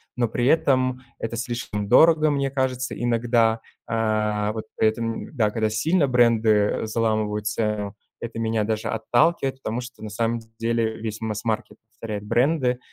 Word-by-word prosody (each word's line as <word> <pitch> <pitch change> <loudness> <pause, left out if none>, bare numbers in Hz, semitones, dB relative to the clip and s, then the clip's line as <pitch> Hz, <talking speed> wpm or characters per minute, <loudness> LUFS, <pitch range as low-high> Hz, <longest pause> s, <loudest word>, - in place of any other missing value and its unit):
Но 120 -2 +1
при 120 +2 -1
этом 130 -4 +2 0.2
это 115 0 -4
слишком 115 -3 -3
дорого, 155 +5 +5
мне 140 -1 0
кажется, 130 -1 -2
иногда. 115 -1 +2 0.3
Э, 105 -2 0
вот 110 0 -5
поэтому, 115 +1 0
да, 110 -7 +1
когда 110 0 0
сильно 150 +9 +2
бренды, 115 -3 +3
э, 105 0 +2
заламывают 110 -2 0
цену, 105 -1 -2 0.2
это 115 -1 -6
меня 110 -1 0
даже 110 0 -2
отталкивает. 135 +4 +1
Потому 115 +1 -3
что 125 0 -11
на 110 - -5
самом 115 +2 -1 0.2
деле 115 -1 0
весь 110 0 -5
массмаркет 110 0 -3
повторяет 105 -2 -6
бренды, 125 +1 +1
115 Hz, 150 wpm, -24 LUFS, 110-125 Hz, 0.3 s, дорого